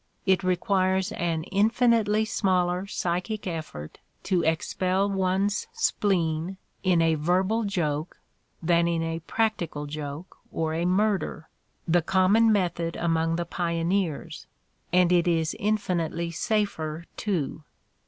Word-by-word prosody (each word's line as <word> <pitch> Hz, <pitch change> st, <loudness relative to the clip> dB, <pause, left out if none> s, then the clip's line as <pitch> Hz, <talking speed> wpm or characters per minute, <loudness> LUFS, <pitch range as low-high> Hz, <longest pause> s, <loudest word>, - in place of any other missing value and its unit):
It 190 Hz, 0 st, +3 dB
requires 185 Hz, +1 st, +1 dB
an 165 Hz, -2 st, -1 dB
infinitely 220 Hz, +2 st, +2 dB
smaller 185 Hz, -3 st, 0 dB
psychic 185 Hz, +4 st, -2 dB
effort 155 Hz, -, -6 dB, 0.2 s
to 185 Hz, -3 st, +1 dB
expel 185 Hz, +4 st, 0 dB
one's 195 Hz, +1 st, 0 dB
spleen 175 Hz, -2 st, 0 dB, 0.2 s
in 180 Hz, -3 st, +3 dB
a 165 Hz, 0 st, +3 dB
verbal 185 Hz, +8 st, +1 dB
joke 160 Hz, -5 st, -2 dB, 0.5 s
than 170 Hz, 0 st, +3 dB
in 165 Hz, -1 st, 0 dB
a 165 Hz, 0 st, -2 dB
practical 170 Hz, -5 st, -1 dB
joke 150 Hz, +3 st, -7 dB
or 160 Hz, -1 st, -1 dB
a 165 Hz, +2 st, -1 dB
murder, 190 Hz, -3 st, 0 dB, 0.4 s
the 175 Hz, +1 st, +3 dB
common 195 Hz, +6 st, +4 dB
method 170 Hz, -4 st, 0 dB
among 165 Hz, -1 st, +1 dB
the 170 Hz, 0 st, -2 dB
pioneers, 170 Hz, -1 st, -2 dB, 0.4 s
and 180 Hz, 0 st, +4 dB
it 175 Hz, -1 st, +3 dB
is 165 Hz, -1 st, +1 dB
infinitely 180 Hz, -6 st, -1 dB
safer, 170 Hz, -5 st, -1 dB
too! 160 Hz, -7 st, -2 dB
180 Hz, 115 wpm, -26 LUFS, 165-195 Hz, 0.5 s, common